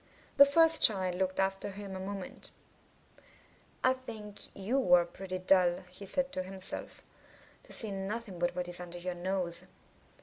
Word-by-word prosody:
The 280 0 +9
first 325 +2 +4
child 190 -4 +7
looked 185 +1 -2
after 195 +1 -1
him 200 -1 -8
a - - -5
moment. 195 0 -6 1.3
*1 255 - +5
think 215 -4 -9 0.2
you 225 +2 -1
are 175 -1 +3
pretty 185 +2 -7
dull," 185 -1 +3
he 195 +2 -11
said 275 +6 -1
to 185 - -3
himself, 190 0 -7 0.6
*'to - - -18
see 220 -3 +3
nothing 195 0 -5
but 175 0 0
what 180 -1 -3
is 175 0 -4
under 175 0 -8
your 180 +1 -4
nose." 175 -1 -3
190 Hz, 160 wpm, -31 LUFS, 180-210 Hz, 1.3 s, The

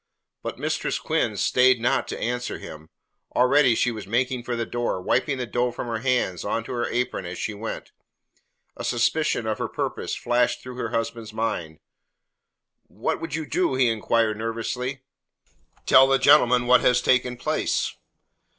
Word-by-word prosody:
But - - -5
Mistress - - -1
Quinn - - -1
stayed 125 -1 +4
not 120 - +1
to - - -5
answer 125 +1 -2
him. 80 0 -11 0.5
Already 125 0 +4
she 120 - +1
was 110 -4 -7
making 125 +3 0
for 120 0 -3
the 115 0 -2
door, 120 -5 -2
wiping 130 +8 0
the 125 - -3
dough 120 +2 0
from 120 - -6
her 115 -2 -3
hands 120 -8 0
on 115 - -1
to - - -8
her 120 -1 -1
apron 120 -7 -2
as 90 0 -6
she 110 - -3
went. 110 +2 -6 0.8
A - - -7
suspicion 120 +1 +1
of 110 -1 -2
her - - -1
purpose - - -3
flashed 120 0 +1
through 125 -1 -8
her 115 -3 -3
husband's 115 -1 -3
mind. 90 -9 -3 1.1
"What - - -3
would 165 -2 -4
you 160 -1 -3
do?" 175 -3 0
he 130 -2 +3
inquired 115 0 +1
nervously. 120 +4 -4 0.8
"Tell 135 0 +7
the 135 0 +4
gentleman 125 -1 +5
what 125 +1 +5
has 125 -1 +4
taken 125 -1 +1
place." - - -1
120 Hz, 170 wpm, -24 LUFS, 115-125 Hz, 1.1 s, Tell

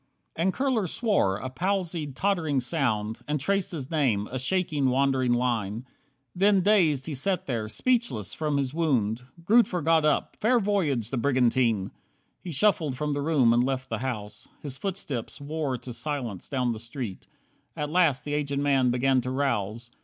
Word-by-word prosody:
16 165 - -1
And 190 - +3
Kurler 245 -6 0
swore, 195 - +1
a 130 - -5
palsied, 170 -1 -2
tottering 165 -6 +1
sound, 115 -6 -1
And 150 0 0
traced 195 +6 0
his 150 -5 -6
name, 125 -10 +1
a 130 - -2
shaking, 150 -1 0
wandering 130 -1 +2
line. 120 -2 0 0.5
Then 195 +1 +4
dazed 175 -9 +3
he 160 - -4
sat 185 +7 0
there, 115 -5 -2
speechless 230 - 0
from 150 -2 -1
his 135 -1 -1
wound. 125 -9 +1 0.2
Grootver 200 -5 +3
got 160 0 +4
up: 150 -1 +1
"Fair 240 +3 +3
voyage, 160 - 0
the 135 - -1
brigantine!" 120 -5 +2 0.5
He 180 - -5
shuffled 155 -4 +1
from 150 +1 -1
the 145 - -2
room, 140 -6 +3
and 120 +1 +3
left 130 0 -2
the 115 - -2
house. 105 -5 -5 0.2
His 140 -3 -4
footsteps 150 - -4
wore 145 -2 -2
to 125 0 -8
silence 120 - -4
down 125 -3 0
the 110 - -4
street. 115 -3 -6 0.5
At 150 0 -3
last 165 -6 +3
the 145 - -3
aged 145 -1 -1
man 140 -3 +3
began 130 +1 +2
to 125 - -4
rouse. 120 -4 -2
140 Hz, 170 wpm, -27 LUFS, 120-165 Hz, 0.5 s, Then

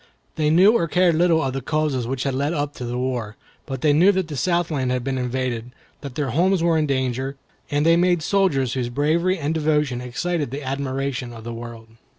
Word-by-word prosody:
They 150 -1 +1
knew 180 +6 +6
or 170 -7 +2
cared 180 +1 +3
little 165 0 +3
of 135 -1 -2
the 135 - -3
causes 145 -4 -1
which 130 0 -2
had 135 - -1
led 140 +4 0
up 145 -2 -2
to 125 - -5
the 120 +1 -3
war; 125 -4 -3 0.3
but 135 -2 -5
they 150 -2 +4
knew 175 +7 +6
that 185 -3 -1
the 150 - -5
Southland 155 -2 0
had 125 -1 -1
been 130 0 -2
invaded, 125 -2 -2 0.3
that 140 -4 -8
their 140 -4 -1
homes 175 +5 +2
were 170 -1 +3
in 155 -1 +1
danger, 130 0 -1 0.3
and 145 +1 +1
they 165 0 +6
made 175 -2 +2
soldiers 150 -11 +1
whose 125 -2 -2
bravery 160 +8 +1
and 155 -1 -2
devotion 150 -5 0
excited 145 +5 -2
the 140 +3 -6
admiration 135 -2 -3
of 115 -1 -10
the 120 +1 -6
world. 115 -1 -9
140 Hz, 215 wpm, -22 LUFS, 125-160 Hz, 0.3 s, knew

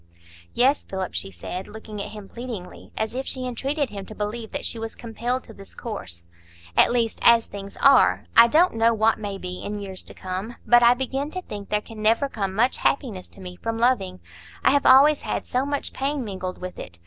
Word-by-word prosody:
"Yes, 270 +4 +3
Philip," 190 -1 -4
she 85 +2 -2
said, 95 - -6
looking 215 -1 -8
at 205 - -5
him 210 -2 -10
pleadingly, 235 -6 -8
as 220 +1 -1
if 260 +2 -4
she 255 -1 -3
entreated 270 +3 -2
him 200 -1 -6
to 215 - -9
believe 220 +2 -4
that - - -4
she 230 - -1
was 225 0 -5
compelled 240 +2 -3
to 225 - -13
this 195 -2 -12
course. 90 - -7 0.5
"At - - +5
least, 235 -2 0
as 235 -1 +6
things 200 0 -9
are; 90 +2 +5
I 230 0 +9
don't 330 +9 +4
know 230 0 +3
what 220 +1 +2
may 205 -2 -4
be 180 -1 -6
in 210 +1 -4
years 190 -2 -6
to - - -9
come. 190 +5 -5
But 240 0 +6
I 240 +1 +6
begin 270 +3 -2
to 370 +3 -5
think 205 - -8
there 210 0 +1
can 215 0 -10
never 225 +6 +3
come 195 -7 -3
much 245 +5 +2
happiness 220 -10 -1
to 195 - -14
me 180 -1 -8
from 225 +3 -3
loving; 205 -7 +1 0.4
I - - +5
have 285 0 +3
always 280 +3 +7
had - - -3
so 255 +3 -1
much 285 0 -2
pain 275 0 -1
mingled 185 -3 -5
with 185 0 -7
it. 85 -1 -9
225 Hz, 220 wpm, -24 LUFS, 195-250 Hz, 0.5 s, I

